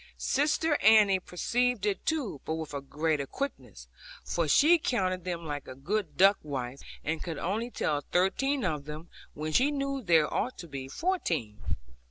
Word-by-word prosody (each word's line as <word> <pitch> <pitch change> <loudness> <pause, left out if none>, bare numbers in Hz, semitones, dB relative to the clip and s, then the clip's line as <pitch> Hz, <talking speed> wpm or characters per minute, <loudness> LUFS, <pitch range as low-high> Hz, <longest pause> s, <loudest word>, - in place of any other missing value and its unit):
Sister 295 +2 +1
Annie 210 -3 +6
perceived 240 +5 0
it 200 -2 -1
too, 265 - -1
but 160 - -2
with 160 -2 -6
a 140 - -3
greater 150 0 -1
quickness; 125 - -6 0.4
for 170 -2 -1
she 315 - +6
counted 185 - -1
them 170 -2 -3
like 145 -2 -5
a 130 - -8
good 185 +6 -3
duck 195 +2 +6
wife, 135 -3 -5 0.2
and 160 +1 -2
could 165 -3 -4
only 220 +7 -2
tell 150 -10 -1
thirteen 245 - +1
of 150 -5 -2
them, 155 +3 -8 0.3
when 155 +1 -3
she 260 - +4
knew 275 -1 -2
there 165 -7 +3
ought 255 - -1
to 170 - -8
be 135 -3 -6
fourteen. 165 - -2
180 Hz, 170 wpm, -29 LUFS, 150-245 Hz, 0.4 s, Annie